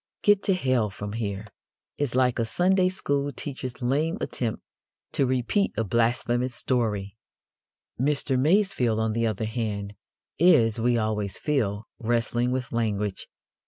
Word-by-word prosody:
Get 205 -1 +5
to 195 - +3
hell 130 -10 +1
from 100 +1 -6
here!" 105 -2 -3 0.5
is 140 -4 -1
like 125 -2 +2
a - - +2
Sunday 180 - +2
school 145 -6 -1
teacher's 130 -4 -6
lame 150 +7 +1
attempt 115 -3 -3 0.5
to 135 - +1
repeat 130 - +1
a 115 - +2
blasphemous 120 +3 +1
story. 105 -6 -1 0.8
Mr. 140 0 +1
Masefield, 145 - +2
on 110 -1 0
the 115 +1 +1
other 110 0 -2
hand, 105 -3 -3 0.5
is, 120 - +5
we 120 +1 +2
always 105 -3 -1
feel, 110 -8 -1
wrestling 120 +1 0
with 125 -1 -2
language. 105 -4 -1
120 Hz, 135 wpm, -26 LUFS, 110-140 Hz, 0.8 s, Get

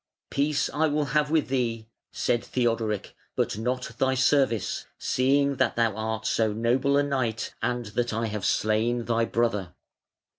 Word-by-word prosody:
"Peace 145 +1 +1
I 155 +2 +2
will 150 0 0
have 150 -1 +2
with 155 -4 +1
thee", 115 -4 -1 0.2
said 120 - 0
Theodoric, 115 -4 -1 0.2
"but 105 - -1
not 125 +1 -2
thy 130 0 +2
service, 130 -5 +1
seeing 140 +2 +2
that - - +1
thou 115 -3 +1
art 110 0 -3
so 110 -2 +2
noble 125 +5 +2
a 145 - +4
knight, 130 -6 -2
and 120 +1 -1
that 120 0 0
I 115 +1 -1
have 105 -2 -4
slain 110 +3 +1
thy 115 -1 +1
brother. 105 -7 -1
120 Hz, 155 wpm, -26 LUFS, 110-135 Hz, 0.2 s, a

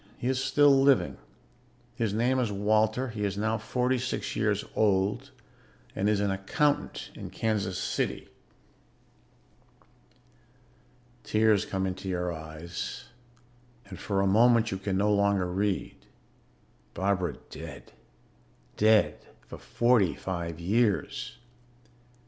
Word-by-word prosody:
He - - -7
is 130 +1 0
still 145 +2 +5
living; 135 -1 +3 0.8
his 115 -3 -1
name 120 +5 +1
is 120 -4 0
Walter; 110 +5 +1
he 105 -2 -4
is 100 -1 -2
now 110 +2 0
forty 125 0 0
six 125 +1 -3
years - - 0
old 105 +5 +1 0.7
and 100 +2 +1
is 105 -1 +2
an 100 -1 +1
accountant 95 +10 -1
in - - -8
Kansas 100 -4 -1
City." - - -2 3.0
Tears 110 -2 +2
come 95 -1 -2
into 95 +1 -4
your 90 -1 -2
eyes 80 +1 -7 0.8
and 95 -3 -10
for 100 -2 -1
a - - +2
moment 115 +3 +4
you 95 - -3
can 95 -1 -2
no 105 +2 +2
longer 100 -2 +2
read. 95 +2 -2 0.9
Barbara 90 -6 0 0.2
dead - - -9 0.9
dead 110 0 +4 0.3
for - - -10
forty 120 -7 +2
five 85 -3 -5
years. 105 +4 0
105 Hz, 115 wpm, -28 LUFS, 95-115 Hz, 3.0 s, still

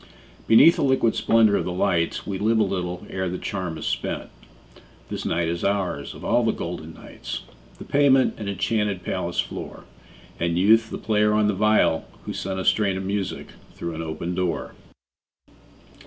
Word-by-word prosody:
Beneath 135 +9 +7
the 160 - 0
liquid 130 -4 +3
splendor 110 -2 +4
of - - -1
the 90 - -3
lights 85 -2 0
We 95 -2 -4
live 110 +2 +2
a 110 - +4
little 90 -3 -3
ere 95 -1 -2
the 90 - -3
charm 90 -5 -4
is - - -6
spent; - - -3 0.8
This - - -4
night 85 0 0
is 85 +1 -3
ours, 100 -2 -1
of - - -10
all 120 +1 +3
the 110 - +2
golden 80 -3 -6
nights, - - -7 0.3
The - - -9
pavement 140 -2 +4
an 105 -2 -4
enchanted 105 -1 -1
palace - - -3
floor, - - -4 0.6
And 85 0 0
Youth 110 +4 +4
the - - -5
player 105 -1 +2
on 105 0 +3
the 105 - +2
viol, 105 -5 +2 0.2
who - - -4
sent 95 0 -3
A 95 - -4
strain 100 -3 +2
of 95 - -4
music 100 -1 -3 0.3
through 85 -1 -5
an 80 - -5
open 80 +2 -4
door. 90 -1 -2
100 Hz, 180 wpm, -24 LUFS, 90-110 Hz, 0.8 s, Beneath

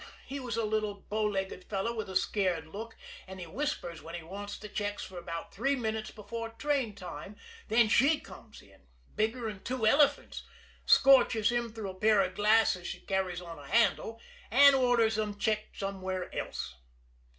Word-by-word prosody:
He 275 +1 -5
was 245 -4 -4
a 230 - +1
little 215 -1 -1
bow 215 +2 -3
legged 195 -3 -2
fellow 205 +3 -2
with 220 -4 -4
a 190 - -7
scared 185 -4 +1
look, 220 +8 -8 0.3
and 190 0 -9
he 180 - -6
whispers 175 - -3
where 165 +1 -8
he 170 - -6
wants 200 +4 -7
the 210 - -9
checks 205 0 -3
for 185 -2 -8
about 170 -1 -6
three 280 +1 +1
minutes 220 -3 -3
before 225 +2 -6
train 255 -2 -1
time, 180 0 -8 0.3
then 230 +1 +4
she 280 +8 +4
comes 215 - -13
in, 95 -9 -22 0.3
bigger'n 220 -2 -2
two 250 -2 -2
elephants, 285 +5 +3 0.5
scorches 250 -5 +6
him 240 -1 -1
through 215 -3 -5
a - - -11
pair 210 +2 +4
of 185 -1 -1
glasses 210 -3 +3
she - - -6
carries 190 -2 -2
on 170 -3 -9
a 140 - -11
handle, 225 +2 +2 0.3
and 280 +5 +8
orders 235 -4 +3
'em 210 -1 -2
checked 215 0 -1
somewhere 190 -2 -4
else. 65 - -4
210 Hz, 175 wpm, -31 LUFS, 190-230 Hz, 0.5 s, and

